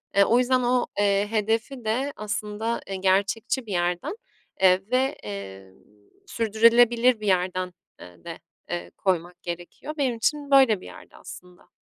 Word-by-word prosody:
Eee, 200 - +6
o 235 +5 +3
yüzden 255 0 +2
o, 245 0 +2
eee, 200 0 +2
hedefi 225 +3 -1
de 260 +6 -1
aslında, 210 +2 -3
eee, 195 - -4
gerçekçi 195 +6 0
bir 205 - -8
yerden, 175 - -1 0.5
eee, 185 0 +5
ve, 260 +2 +1
eee, 95 -2 -8 0.5
sürdürülebilir 230 +2 +3
bir 210 - -5
yerden, 185 -1 0 0.3
eee, 90 -1 -14
de, - - -8 0.3
eee, 85 0 -5
koymak 180 -2 -2
gerekiyor. 175 - -7
Benim 260 -5 0
için 285 +5 -1
böyle 260 -8 +5
bir - - -12
yerdi - - -13
aslında. 180 0 -13
210 Hz, 145 wpm, -25 LUFS, 180-240 Hz, 0.5 s, Eee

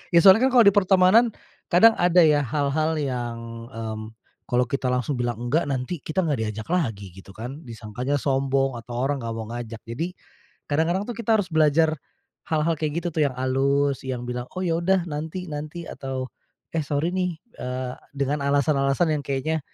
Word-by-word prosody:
Ya - - +9
soalnya 210 +7 +8
kan - - -1
kalau 240 - +8
di 200 - +9
pertemanan, 195 +4 +5 0.4
kadang 205 +7 +7
ada 175 0 +5
ya 150 -2 +5
hal-hal 145 +4 0
yang, 120 -5 -4
mmm, 110 -3 -5 0.5
kalau 125 0 +2
kita 130 +1 -2
langsung 125 +1 -1
bilang 120 -1 -1
enggak, 120 +8 0
nanti 135 +5 -2
kita 155 +6 -1
enggak 135 -9 0
diajak 110 0 -6
lagi 115 - -1
gitu 95 +2 -14
kan. 125 +6 -7
Disangkanya 115 +5 -3
sombong 135 -2 0
atau 120 +1 -7
orang 140 0 0
enggak 115 -1 -4
mau 110 -1 -5
ngajak. 115 -2 -6
Jadi, 160 +11 -4 0.6
kadang-kadang 165 +6 +1
tuh 240 - -5
kita 225 -1 +1
harus 185 -4 -3
belajar 155 0 +3 0.5
hal-hal 160 +1 +1
kayak 155 +2 -2
gitu - - -1
tuh, 155 -1 +1
yang 130 - -10
alus 135 +2 +1
yang 125 -2 -3
bilang, 125 0 -4
"Oh 185 - -2
ya 165 -2 +1
udah 185 +1 +2
nanti 160 +4 -4
nanti," 155 +3 -5
atau, 130 -1 -5 0.4
"Eh, 165 - 0
sorry 150 +4 0
nih," 180 -2 -1 0.3
eee, 125 0 -3 0.2
dengan 140 +1 0
alasan-alasan 140 +3 +2
yang 150 -1 0
kayaknya 140 +4 -1
140 Hz, 180 wpm, -24 LUFS, 125-165 Hz, 0.6 s, Ya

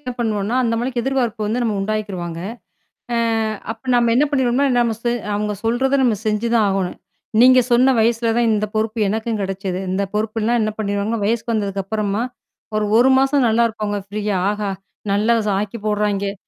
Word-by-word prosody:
என்ன 255 -4 -5
பண்ணுவோன்னா, 215 0 -1
அந்த 230 -2 0
அளவுக்கு 240 +1 -1
எதிர்பார்ப்பு 240 -5 -1
வந்து 235 +4 -1
நம்ம 220 -3 0
உண்டாக்கிருவாங்க. 195 -5 -3 0.8
ஆ - - +1 0.5
அப்ப 225 - -11
நம்ம 235 -1 +3
என்ன 280 +4 +4
பண்ணிருவம்ன்னா, 265 0 +2
நம்ம 235 -2 +1
சு 240 - 0 0.3
அவுங்க 210 0 -1
சொல்றத 265 +4 +1
நம்ம 230 -4 +2
செஞ்சுதான் 215 0 +2
ஆகணும். 195 -2 -2 0.4
நீங்கச் 255 0 +6
சொன்ன 255 +3 +5
வயசுல 230 0 +2
தான் 240 -1 +3
இந்த 215 0 0
பொறுப்பு 220 +1 -1
எனக்கும் 220 +1 -2
கிடைச்சது. 190 -1 -3
இந்த 195 +2 0
பொறுப்புல்லாம் 220 +2 0
என்ன 215 0 0
பண்ணிருவாங்க, 205 +2 -1
வயசுக்கு 230 +2 0
வந்ததுக்கு 200 -3 -1
அப்பறமா 210 +1 -1 0.5
ஒரு, 215 - +1
1 250 +3 +5
மாசம் 270 0 +3
நல்லா 230 +1 +3
இருப்பாங்க 215 -2 -3
ப்ரீயா 205 -1 -1
ஆஹா! 210 -1 -3 0.4
நல்லா 210 +4 +3 0.3
ஆக்கிப் 210 +1 -6
போடுறாங்கே! 205 -1 0
220 Hz, 165 wpm, -20 LUFS, 205-240 Hz, 0.8 s, நீங்கச்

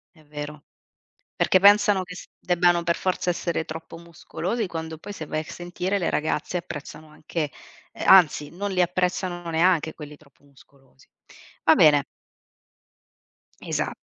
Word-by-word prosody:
È 155 - -21
vero. 150 0 -8 0.7
Perché 185 - +3
pensano 205 -1 +5
che 180 0 -10
s - - -10
debbano 175 -1 +2
per 170 0 +1
forza 185 -1 -1
essere 170 -1 -1
troppo 160 +1 -8
muscolosi, 175 +5 -4
quando 160 -1 -6
poi, 205 - -9
se 160 - -7
vai 155 +1 -3
a - - -4
sentire 180 +3 -3
le 180 - -1
ragazze, 155 +3 -1
apprezzano 155 -2 -8
anche 155 0 -4 0.4
eh, - - -7
anzi, 160 -6 +5
non 200 +3 -4
li 180 -1 +1
apprezzano 180 -1 -1
neanche 165 -1 +2
quelli 150 -1 -10
troppo 140 -1 -25
muscolosi. 135 -1 -24 0.6
Va - - +6
bene. 145 -2 +5 1.6
Esa - - -2
170 Hz, 145 wpm, -24 LUFS, 155-180 Hz, 1.6 s, Va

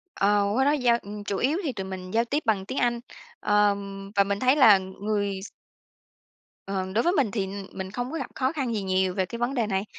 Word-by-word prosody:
Ờ, 205 +1 +3
qua 265 - +3
đó 290 - +4
giao 245 -5 +3
ừ, 200 - -12 0.2
chủ 200 - -2
yếu 290 +7 +1
thì 275 -5 -2
tụi 190 - -5
mình 185 -1 -7
giao 230 +1 +3
tiếp 290 +5 0
bằng 200 -4 +1
tiếng 260 - -5
Anh, 240 -1 +1 0.4
ờ, 210 -1 +3 0.4
và 200 - +5
mình 200 0 -2
thấy 255 +2 +4
là 220 -9 +8
người 200 +1 -3
s - - -8 1.2
Ờ, 190 -1 -2
đối 230 - +3
với 350 - +2
mình 260 - +2
thì 195 -4 -1 0.3
mình 190 0 -6
không 245 +4 -4
có 325 - -3
gặp - - -4
khó 260 +1 0
khăn 265 -7 -2
gì 210 - -1
nhiều 185 -1 +1
về 190 -1 0
cái 235 +6 -7
vấn 240 +3 0
đề 235 -5 0
này, 195 0 -1
210 Hz, 240 wpm, -26 LUFS, 195-250 Hz, 1.2 s, là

